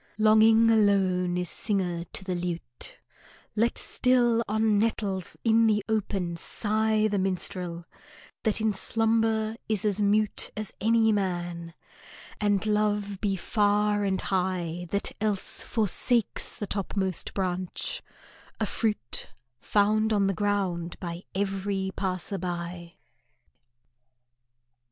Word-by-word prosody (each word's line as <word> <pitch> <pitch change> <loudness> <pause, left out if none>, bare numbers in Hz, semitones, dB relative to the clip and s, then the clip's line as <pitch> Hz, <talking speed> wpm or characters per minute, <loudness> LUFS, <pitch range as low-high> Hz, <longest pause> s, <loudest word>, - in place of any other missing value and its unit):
Longing 220 +1 +6
alone 190 -4 +2
is 180 0 -1
singer 180 -4 0
to 190 - -7
the 185 -1 -3
lute; 175 -8 -5 0.6
Let 230 +2 +1
still 240 -2 +2
on 215 -1 +2
nettles 205 -4 -1
in 225 0 +4
the 210 -2 +1
open 195 -5 -1
sigh 215 +3 +1
The 205 -2 0
minstrel, 180 -2 -3 0.6
that 220 -2 +1
in 220 -1 +1
slumber 225 +1 +1
is 215 -2 +1
as 210 0 +1
mute 210 +1 +1
As 215 -1 -2
any 225 +1 +4
man, 175 -4 -2 0.6
and 205 -1 +1
love 210 -2 0
be 200 -2 +1
far 205 +1 +1
and 190 -1 0
high, 180 -2 -2
That 200 +2 -1
else 210 -3 0
forsakes 225 +1 +1
the 210 - -4
topmost 190 -1 -2
branch, 185 -2 -2 0.6
a - - +1
fruit 210 - -1 0.3
Found 215 +1 +2
on 205 -2 +3
the 195 - +1
ground 185 -4 -1
by 170 0 -6
every 195 0 -1
passer 190 +1 -2
by. 175 -1 -5
200 Hz, 115 wpm, -27 LUFS, 185-215 Hz, 0.6 s, Longing